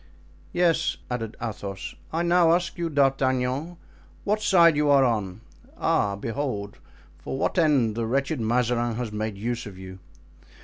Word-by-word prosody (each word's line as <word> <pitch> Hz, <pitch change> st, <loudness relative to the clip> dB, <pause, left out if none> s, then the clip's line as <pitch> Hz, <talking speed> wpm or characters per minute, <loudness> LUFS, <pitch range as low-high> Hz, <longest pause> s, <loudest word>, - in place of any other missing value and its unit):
"Yes," 175 Hz, -2 st, +1 dB
added 115 Hz, -3 st, -4 dB
Athos, 100 Hz, -4 st, -5 dB, 0.2 s
"I 165 Hz, +2 st, 0 dB
now 170 Hz, -1 st, +4 dB
ask 175 Hz, -1 st, -2 dB
you, 170 Hz, -1 st, -2 dB
D'Artagnan, 135 Hz, +2 st, +1 dB, 0.5 s
what 210 Hz, +1 st, 0 dB
side 170 Hz, -6 st, +5 dB
you 150 Hz, 0 st, +2 dB
are 140 Hz, -1 st, +6 dB
on? 105 Hz, -4 st, -2 dB, 0.4 s
Ah! 100 Hz, -1 st, +1 dB
behold 105 Hz, -1 st, -4 dB, 0.4 s
for -, -, -5 dB
what 180 Hz, -, 0 dB
end 140 Hz, -9 st, +3 dB
the 115 Hz, +1 st, -2 dB
wretched 135 Hz, +2 st, -1 dB
Mazarin 120 Hz, 0 st, +1 dB
has 120 Hz, -2 st, -4 dB
made 105 Hz, -1 st, -3 dB
use 115 Hz, +2 st, -3 dB
of 95 Hz, -3 st, -10 dB
you. 95 Hz, 0 st, -10 dB
125 Hz, 145 wpm, -25 LUFS, 110-155 Hz, 0.5 s, are